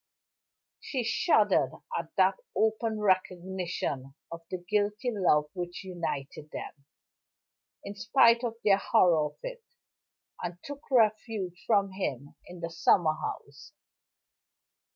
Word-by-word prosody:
She 260 -4 -3
shuddered 230 - +3 0.2
at - - -3
that - - +4 0.2
open 220 0 +1
recognition 180 -7 -1 0.2
of 170 0 -7
the 185 - -3
guilty 210 +6 -1
love 150 -7 +2
which 175 0 -5
united 155 -5 -5
them, 140 -2 -8 1.0
in 200 - -6
spite 230 +3 +4
of 230 -2 -2
their 195 -2 +6
horror 165 -5 +3
of 150 - -14
it, - - -6 0.8
and 175 0 -4
took 285 +1 -9
refuge 215 -5 +1
from 200 -3 +3
him 145 -8 -4
in 175 -1 -10
the 170 0 -4
summer 165 -1 +3
house. 145 - -7
190 Hz, 115 wpm, -29 LUFS, 170-220 Hz, 1.0 s, their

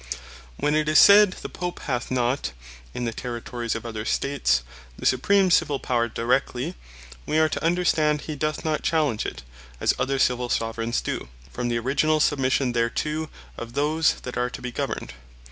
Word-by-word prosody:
When 150 - +1
it 155 0 +1
is 155 - +4
said, 200 -1 +8
the - - -3
Pope 180 -1 -5
hath 125 -5 -3
not 130 +2 0 0.4
(in 120 - -4
the 115 - -1
Territories 120 -1 -4
of 115 - -5
other 110 -2 -4
States) 115 - +1 0.3
the - - -8
Supreme 190 +9 +3
Civill 145 -3 +3
Power 120 -3 0
Directly; 125 +6 -1 0.5
we 155 - +1
are 160 0 +5
to - - -3
understand, 160 -3 +2
he 155 - -5
doth 155 +2 -2
not 155 -1 0
challenge 150 -9 +1
it, 65 - -7 0.4
as - - +2
other 135 +1 0
Civill 125 -2 +1
Soveraigns 115 +1 -1
doe, - - -4 0.2
from 120 0 -2
the 120 -1 0
originall 145 +6 +1
submission 135 -3 +1
thereto 150 +7 -1 0.3
of 120 0 -7
those 155 +3 +2
that 125 - -6
are 125 0 0
to - - -8
be 125 - -4
governed. 65 - -4
130 Hz, 175 wpm, -24 LUFS, 120-155 Hz, 0.5 s, said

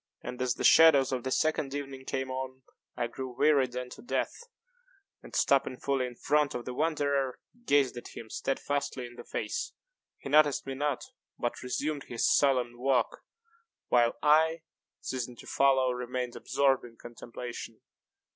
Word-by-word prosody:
And, 125 0 -6
as 125 -1 +1
the - - -4
shades 145 -5 +7
of 125 -2 -2
the 130 - -2
second 145 0 0
evening 135 -2 -6
came 130 0 -3
on, 130 0 -5 0.3
I 120 - 0
grew 125 +1 -7
wearied 135 -5 +3
unto 125 0 -6
death, 245 - -1 0.9
and, - - -11
stopping 135 -2 +2
fully 135 -2 0
in 120 - -10
front 150 +2 +1
of 120 - -4
the 125 - -4
wanderer, 140 -3 0 0.3
gazed 140 -3 +3
at 120 - -9
him 115 - -7
steadfastly 135 -1 -2
in 120 - -10
the - - -10
face. 475 -1 -3 0.4
He - - -9
noticed 145 0 +4
me 135 - -4
not, 145 0 -1 0.3
but 120 - -3
resumed 140 +3 -2
his 120 - 0
solemn 125 -4 +2
walk, 130 -1 +1 0.7
while 120 -1 +4
I, 160 +2 +4 0.4
ceasing 125 -2 -4
to - - -13
follow, 135 -2 +3
remained 125 0 -3
absorbed 135 -2 +1
in 115 -1 -12
contemplation. 120 -1 -8
130 Hz, 155 wpm, -30 LUFS, 125-140 Hz, 0.9 s, shades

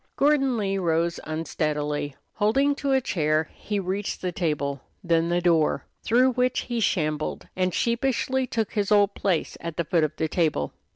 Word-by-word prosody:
Gordon 275 -3 +3
Lee 195 -2 0
rose 170 -1 0
unsteadily. 150 -2 -2 0.2
Holding 270 +7 +2
to 280 -1 -2
a 265 - +4
chair, 155 -6 0
he 210 -1 -3
reached 195 +2 -3
the 180 - 0
table, 145 -5 -2 0.2
then 165 -1 +2
the 175 0 +1
door, 165 -3 +2 0.2
through 250 +3 +4
which 250 0 +1
he 240 -2 -3
shambled, 155 -7 -1
and 185 0 +1
sheepishly 255 +4 0
took 225 -4 -1
his 205 -2 -1
old 205 -1 +5
place 185 -5 -1
at 170 -2 -6
the 170 - 0
foot 165 0 +2
of 155 - -1
the 160 - -1
table. 155 - 0
180 Hz, 170 wpm, -25 LUFS, 160-235 Hz, 0.2 s, old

